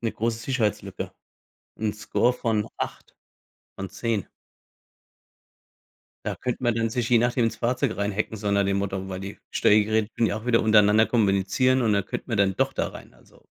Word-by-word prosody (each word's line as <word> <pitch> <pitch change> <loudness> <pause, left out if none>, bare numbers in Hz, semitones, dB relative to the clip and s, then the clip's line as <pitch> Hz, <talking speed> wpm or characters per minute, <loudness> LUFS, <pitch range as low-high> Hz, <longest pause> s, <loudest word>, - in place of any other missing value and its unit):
'ne 115 -2 -2
große 115 0 -1
Sicherheitslücke, 115 -4 -2 0.7
'n 110 -1 -1
Score 115 +3 +1
von 110 -3 -1
8 - - -6 0.6
von 95 0 -5
10. 105 0 -2 2.0
Da - - -2
könnte 125 0 -4
man 120 -2 +2
dann 115 0 0
sich, 120 0 -1
je 120 - +6
nachdem, 120 0 +2
ins 115 - -1
Fahrzeug 125 -1 0
reinhacken, 100 +2 -2
so 105 -1 -2
nach 100 0 +3
dem 100 0 +1
Motto, 95 -1 -3
weil 95 0 -5
die 100 +1 -7
Steuergeräte 110 +1 +3
können 115 - +2
ja 105 - -2
auch 110 - -10
wieder 115 -2 +3
untereinander 110 0 +5
kommunizieren 110 +4 +2
und 110 -3 +2
dann 100 -2 +1
könnte - - -5
man 115 -4 -1
dann 95 -1 +2
doch - - +1
da - - -1
rein, - - -12
also - - -23
110 Hz, 180 wpm, -25 LUFS, 100-115 Hz, 2.0 s, je